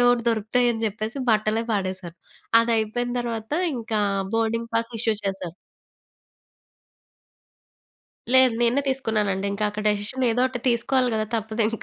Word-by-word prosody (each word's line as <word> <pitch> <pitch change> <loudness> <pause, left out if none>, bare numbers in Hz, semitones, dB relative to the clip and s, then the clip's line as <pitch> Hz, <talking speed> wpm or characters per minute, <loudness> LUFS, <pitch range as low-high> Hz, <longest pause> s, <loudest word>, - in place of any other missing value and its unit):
ఏవొకటి 245 -1 +4
దొరుకుతాయని 225 +1 +1
చెప్పేసి 215 +5 -3
బట్టలే 215 +1 +2
పాడేశాను. 185 -3 -3 0.5
అది 230 0 0
అయిపోయిన 245 +3 -2
తర్వాత 230 +1 -4 0.2
ఇంకా 225 -2 -2 0.3
బోర్డింగ్ 230 +1 0
పాస్ 230 +1 0
ఇష్యూ 225 0 +1
చేశారు. 190 -3 -3 2.8
లేదు. 260 -2 +6
నేనే 240 +4 +3
తీసుకున్నానండి. 210 -7 0
ఇంకా 210 +1 -1
అక్క 210 +1 -5
డెసిషన్ 210 +5 0
ఏదోటి 250 +1 +1
తీసుకోవాలి 250 +1 +2
గదా! 215 0 0
తప్పదింక. 220 +1 -1
225 Hz, 115 wpm, -24 LUFS, 215-240 Hz, 2.8 s, లేదు